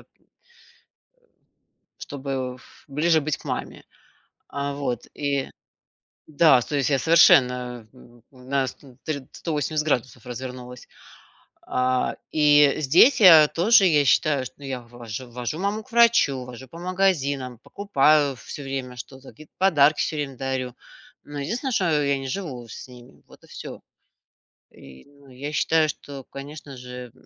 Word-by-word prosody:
э, -, -, -19 dB, 1.9 s
чтобы 135 Hz, -3 st, -5 dB
ф 130 Hz, -, -20 dB
ближе 160 Hz, +4 st, +2 dB
быть 150 Hz, -1 st, -2 dB
к -, -, -19 dB
маме. -, -, -5 dB, 0.7 s
А, 140 Hz, 0 st, -4 dB
вот, 125 Hz, -5 st, -4 dB
и 140 Hz, -2 st, -2 dB, 0.8 s
да, 155 Hz, -4 st, +4 dB
то 145 Hz, -, -4 dB
есть 140 Hz, -, +1 dB
я 140 Hz, -2 st, +2 dB
совершенно 125 Hz, -7 st, +4 dB, 0.4 s
на 130 Hz, +1 st, -2 dB
ст -, -, -10 dB
на 130 Hz, -3 st, -17 dB, 0.4 s
180 155 Hz, -1 st, -2 dB
градусов 125 Hz, -3 st, -2 dB
развернулась. 125 Hz, 0 st, -8 dB, 0.8 s
А, 125 Hz, 0 st, 0 dB, 0.2 s
и 145 Hz, -2 st, +5 dB
здесь 170 Hz, -, +5 dB
я 160 Hz, -6 st, +9 dB
тоже, 195 Hz, +5 st, +4 dB
я 145 Hz, -4 st, +3 dB
считаю, 135 Hz, +1 st, +2 dB
я 135 Hz, -3 st, -5 dB
вож 115 Hz, -1 st, -8 dB
вожу 125 Hz, +5 st, -6 dB
маму 205 Hz, +3 st, -2 dB
к 260 Hz, -, -23 dB
врачу, 230 Hz, -, +3 dB
вожу 125 Hz, +1 st, -11 dB
по 165 Hz, +7 st, -12 dB
магазинам, 145 Hz, -9 st, -1 dB
покупаю 150 Hz, -6 st, +2 dB
всё 135 Hz, +4 st, -9 dB
время 135 Hz, -2 st, -5 dB
что-то, 130 Hz, +2 st, -11 dB
какие-то 155 Hz, 0 st, -17 dB
подарки 155 Hz, -6 st, +4 dB
всё 155 Hz, -, -2 dB
время 140 Hz, -3 st, -4 dB
дарю. 130 Hz, -2 st, -3 dB, 0.5 s
Но 145 Hz, 0 st, -7 dB
единственное, 240 Hz, -, -3 dB
что 160 Hz, -7 st, +1 dB
я 140 Hz, -1 st, +1 dB
не 135 Hz, -, -6 dB
живу 130 Hz, -7 st, -5 dB
с 110 Hz, -, -9 dB
ними. 125 Hz, +1 st, -15 dB
Вот -, -, -19 dB
и -, -, -18 dB
всё. -, -, -9 dB, 0.9 s
И, 65 Hz, -1 st, -15 dB
ну, 140 Hz, -1 st, -21 dB
я 140 Hz, +4 st, -7 dB
считаю, 160 Hz, 0 st, +2 dB
что, 140 Hz, -1 st, -8 dB
конечно 140 Hz, 0 st, -10 dB
же, 125 Hz, -1 st, -9 dB
140 Hz, 140 wpm, -24 LUFS, 125-155 Hz, 1.9 s, я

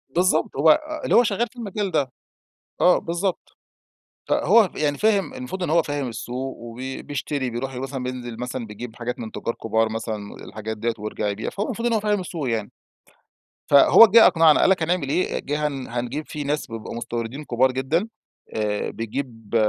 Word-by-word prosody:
بالضبط، 175 Hz, -2 st, +2 dB
هو 155 Hz, -, +6 dB, 0.2 s
اللي -, -, +2 dB
هو 240 Hz, -, +7 dB
شغال 225 Hz, +1 st, 0 dB
في 245 Hz, -, -27 dB
المجال 205 Hz, -4 st, -3 dB
ده. 135 Hz, -6 st, 0 dB, 0.7 s
آه، 180 Hz, -, +6 dB
بالضبط. 175 Hz, +2 st, -3 dB, 0.7 s
فهو 225 Hz, -5 st, +4 dB
يعني 145 Hz, -1 st, 0 dB
فاهم 215 Hz, +2 st, +2 dB
المفروض 255 Hz, -8 st, -5 dB
إن -, -, -2 dB
هو 165 Hz, +2 st, +4 dB
فاهم 145 Hz, -3 st, -2 dB
السوق 125 Hz, +3 st, -5 dB
وبي 125 Hz, +3 st, -7 dB
بيشتري 145 Hz, -2 st, -3 dB
بيروح 130 Hz, +3 st, -4 dB
مثلًا 135 Hz, +1 st, -4 dB
بينزل 125 Hz, -2 st, -5 dB
مثلًا 125 Hz, 0 st, -4 dB
بيجيب 110 Hz, +2 st, -8 dB
حاجات 125 Hz, +2 st, -4 dB
من 110 Hz, -2 st, -6 dB
تُجار 115 Hz, -, -3 dB
كبار 110 Hz, 0 st, 0 dB
مثلًا 110 Hz, -2 st, -5 dB
الحاجات 110 Hz, 0 st, -6 dB
دِيَّة 115 Hz, +2 st, -1 dB
ويرجع 105 Hz, 0 st, -3 dB
يبيع، 100 Hz, +2 st, -3 dB
فهو 205 Hz, -, -3 dB
المفروض 235 Hz, 0 st, -2 dB
إن 235 Hz, -, +1 dB
هو 220 Hz, -, +3 dB
فاهم 210 Hz, -1 st, +1 dB
السوق 165 Hz, -7 st, -4 dB
يعني. 110 Hz, -3 st, -2 dB, 1.0 s
فهو 145 Hz, +10 st, +9 dB
جِه 225 Hz, +2 st, +7 dB
أقنعنا 165 Hz, -3 st, +5 dB
قال -, -, +5 dB
لك 190 Hz, -3 st, +2 dB
هنعمل 165 Hz, -3 st, 0 dB
إيه، 170 Hz, +6 st, 0 dB
جِه 150 Hz, +1 st, -1 dB
هن 135 Hz, -3 st, -4 dB
هنجيب 125 Hz, +5 st, -4 dB
في 150 Hz, -1 st, -5 dB
ناس 150 Hz, +2 st, -1 dB
بيبقوا 115 Hz, -1 st, -7 dB
مستوردين 120 Hz, +4 st, -4 dB
كبار 130 Hz, 0 st, +2 dB
جدًا 140 Hz, -, 0 dB, 0.5 s
آآ 105 Hz, -1 st, -1 dB
بيجيب 115 Hz, -1 st, -6 dB
135 Hz, 180 wpm, -23 LUFS, 115-180 Hz, 1.0 s, فهو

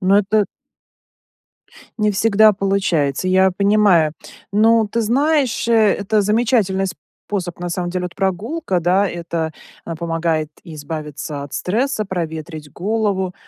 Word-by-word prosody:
Но 195 Hz, +2 st, +4 dB
это 210 Hz, 0 st, +2 dB, 1.5 s
не 210 Hz, -1 st, +2 dB
всегда 215 Hz, +1 st, +4 dB
получается. 190 Hz, -6 st, 0 dB
Я 190 Hz, +1 st, +4 dB
понимаю. 200 Hz, -5 st, +3 dB, 0.4 s
Ну, 220 Hz, +1 st, +4 dB
ты 230 Hz, +3 st, -1 dB
знаешь, 270 Hz, +2 st, +1 dB
э, 235 Hz, -, +3 dB
это 215 Hz, -1 st, +3 dB
замечательный 210 Hz, -2 st, +1 dB
способ 175 Hz, +2 st, -6 dB
на 175 Hz, 0 st, -4 dB
самом 175 Hz, 0 st, -2 dB
деле. 180 Hz, 0 st, -2 dB
Вот 175 Hz, -, -8 dB
прогулка, 195 Hz, -, -1 dB
да, 185 Hz, +4 st, +2 dB
это, 170 Hz, -2 st, -3 dB, 0.3 s
а, 165 Hz, -, -5 dB
помогает 165 Hz, -2 st, -1 dB
избавиться 150 Hz, -2 st, -6 dB
от 145 Hz, -, -10 dB
стресса, 220 Hz, +3 st, -1 dB
проветрить 160 Hz, -4 st, -5 dB
голову, 195 Hz, -1 st, -1 dB
190 Hz, 125 wpm, -19 LUFS, 170-215 Hz, 1.5 s, Но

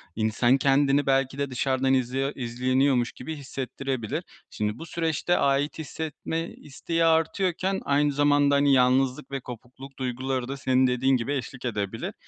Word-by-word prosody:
insan 115 Hz, +4 st, +2 dB
kendini 140 Hz, +1 st, +3 dB
belki 135 Hz, 0 st, +1 dB
de 140 Hz, -1 st, -2 dB
dışarıdan 130 Hz, +1 st, +1 dB
izliyo 130 Hz, +2 st, 0 dB
izleniyormuş 125 Hz, +1 st, +1 dB
gibi 155 Hz, +5 st, -7 dB
hissettirebilir. 135 Hz, +1 st, -4 dB, 0.3 s
Şimdi, 105 Hz, 0 st, -3 dB
bu 165 Hz, -, -7 dB
süreçte 165 Hz, +1 st, 0 dB
ait 140 Hz, +3 st, +1 dB
hissetme 160 Hz, +1 st, -4 dB
isteği 165 Hz, +4 st, -3 dB
artıyorken 180 Hz, +3 st, +1 dB
aynı 145 Hz, +1 st, +2 dB
zamanda, 145 Hz, 0 st, +3 dB
hani, 140 Hz, 0 st, +4 dB
yalnızlık 130 Hz, +2 st, +2 dB
ve 135 Hz, -, -2 dB
kopukluk 130 Hz, +2 st, -11 dB
duyguları 130 Hz, 0 st, -2 dB
da 140 Hz, +1 st, -5 dB
senin 130 Hz, 0 st, +2 dB
dediğin 130 Hz, +1 st, +2 dB
gibi 120 Hz, +5 st, -2 dB
eşlik 130 Hz, -1 st, -5 dB
edebilir. 105 Hz, -4 st, -3 dB
135 Hz, 140 wpm, -26 LUFS, 125-145 Hz, 0.3 s, hani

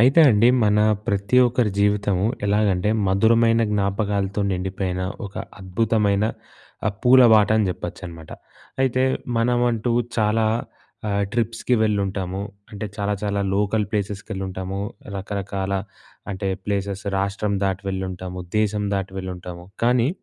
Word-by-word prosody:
అయితే 135 Hz, +7 st, +6 dB
అండి 110 Hz, +2 st, +5 dB, 0.2 s
మన 105 Hz, 0 st, +3 dB, 0.3 s
ప్రతి 100 Hz, +2 st, 0 dB
ఒక్కరి 120 Hz, -2 st, +1 dB
జీవితము 100 Hz, -1 st, +2 dB, 0.2 s
ఎలాగంటే 100 Hz, -1 st, +2 dB, 0.2 s
మధురమైన 115 Hz, +4 st, +4 dB
జ్ఞాపకాలతో 100 Hz, 0 st, 0 dB
నిండిపోయిన 95 Hz, 0 st, -2 dB, 0.2 s
ఒక 100 Hz, -, -13 dB, 0.3 s
అద్భుతమైన 100 Hz, +1 st, +1 dB, 0.6 s
ఆహ్, 100 Hz, -, 0 dB
పూల 130 Hz, +1 st, +7 dB
బాట 105 Hz, -2 st, +6 dB
అని 110 Hz, -2 st, +2 dB
చెప్పొచ్చనమాట. 85 Hz, -2 st, -7 dB, 0.5 s
అయితే 130 Hz, -1 st, +2 dB, 0.3 s
మనమంటూ 120 Hz, 0 st, +1 dB, 0.2 s
చాలా 110 Hz, 0 st, +2 dB, 0.6 s
ఆహ్, 100 Hz, 0 st, +1 dB
ట్రిప్స్‌కి 115 Hz, +1 st, 0 dB
వెళ్ళుంటాము. 100 Hz, -3 st, -1 dB, 0.3 s
అంటే 105 Hz, 0 st, -5 dB
చాలా 100 Hz, 0 st, -1 dB
చాలా 100 Hz, -1 st, 0 dB
లోకల్ 105 Hz, +1 st, +1 dB
ప్లేసెస్‍కెళ్ళుంటాము. 95 Hz, -2 st, -4 dB, 0.4 s
రకరకాల 100 Hz, 0 st, -3 dB, 0.6 s
అంటే 95 Hz, 0 st, -3 dB, 0.2 s
ప్లేసెస్ 100 Hz, 0 st, -2 dB
రాష్ట్రం 100 Hz, +1 st, -1 dB
దాటి 95 Hz, 0 st, -1 dB
వెళ్ళుంటాము. 95 Hz, -1 st, -4 dB, 0.2 s
దేశం 105 Hz, -1 st, +1 dB
దాటి 95 Hz, -1 st, -3 dB
వెళ్ళుంటాము. 90 Hz, -2 st, -7 dB, 0.2 s
కానీ 120 Hz, +1 st, +3 dB
100 Hz, 115 wpm, -22 LUFS, 95-110 Hz, 0.6 s, పూల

